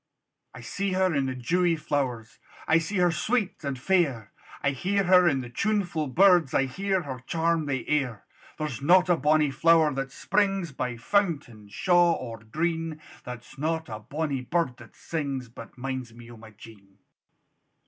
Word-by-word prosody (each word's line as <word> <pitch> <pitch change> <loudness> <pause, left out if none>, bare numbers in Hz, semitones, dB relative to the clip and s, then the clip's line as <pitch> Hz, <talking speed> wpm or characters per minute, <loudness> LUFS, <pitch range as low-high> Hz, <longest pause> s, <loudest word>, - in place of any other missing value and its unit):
I - - -9
see 195 -1 -3
her 185 -1 +2
in 140 -2 +1
the 130 - -3
dewey 170 +7 +1
flowers, 130 -7 -3 0.3
I 160 - +5
see 165 +6 -4
her 180 -1 +4
sweet 215 0 -1
and 140 -2 -3
fair; 135 - 0 0.3
I 140 - +2
hear 195 +9 0
her 180 -1 +5
in 135 -4 0
the 120 - -8
tunefu' 180 - -1
birds, 175 -1 +4
I 135 - +3
hear 190 +7 -1
her 130 -3 -6
charm 165 -2 0
the 130 -3 -2
air: 135 -8 -1 0.3
There's 150 -5 -4
not 180 +5 +5
a 175 - +5
bonnie 150 0 +2
flower 160 0 +4
that 135 0 -4
springs 195 -3 0
By 125 -3 -4
fountain, 125 - -1
shaw, 175 - +3
or 115 -7 -6
green, 160 +7 -3 0.3
There's 125 +1 -9
not 160 0 -2
a 110 -1 -6
bonie 140 +3 -3
bird 130 -2 -1
that 115 -2 -15
sings, 140 -6 -4
But 115 +1 -12
minds 130 -2 -5
me 120 0 -12
o' - - -11
my 110 0 -13
Jean. 100 -2 -16
150 Hz, 170 wpm, -26 LUFS, 125-175 Hz, 0.3 s, I